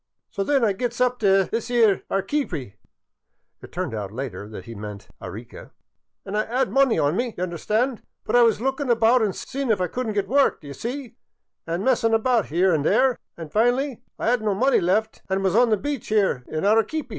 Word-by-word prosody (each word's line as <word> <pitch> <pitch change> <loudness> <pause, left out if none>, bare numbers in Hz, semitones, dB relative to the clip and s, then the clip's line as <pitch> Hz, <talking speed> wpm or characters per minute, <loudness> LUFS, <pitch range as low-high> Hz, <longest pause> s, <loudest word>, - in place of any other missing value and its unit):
" - - -57
So 200 - -2
then 270 +2 +2
I 205 - +2
gets 240 +4 -3
up 250 0 +1
t' 195 -3 +4
this 225 +4 -4
'ere 225 -5 +3
Arequeepy 190 - -2 0.4
" - - -53
(It - - -12
turned 180 -7 -3
out 105 -3 -4
later 120 -3 -6
that 110 - -9
he 115 - -8
meant 105 -1 -8
Arica) - - -9 0.2
" - - -58
an' 195 - -5
I 215 - +2
'ad 250 +4 -1
money 270 -4 +3
on 145 +3 +1
me, 240 +1 -1
d'y* 180 - -4
understand, 215 - -1 0.2
but - - -1
I 245 - +7
was 230 -3 +4
lookin' 270 +2 -2
about 235 +1 +4
an' 210 -3 +1
seein' 270 +7 -5
if 215 - +2
I 180 - +1
could 250 +7 -4
n't 215 - -3
get 200 -1 0
work, 275 +4 +3
d' - - -31
ye 140 -1 -8
see, 245 - -6 0.5
an' 170 +3 -2
messin* 230 -3 +2
about 230 - +1
'ere 180 +3 +3
an' 155 - +1
there, 255 - +2 0.2
an' 165 -2 -8
fin'ly 245 - +1 0.2
I - - 0
'ad 245 - +2
n't 215 - -8
no 205 -2 +1
money 260 +6 +3
left 215 +5 0
an' 190 0 0
was 190 0 +1
on 240 +1 +5
the 215 - +3
beach 285 +2 -4
there 195 -12 +1
in 155 - -3
Arequeepy. 225 +8 +1
220 Hz, 230 wpm, -23 LUFS, 180-250 Hz, 0.5 s, I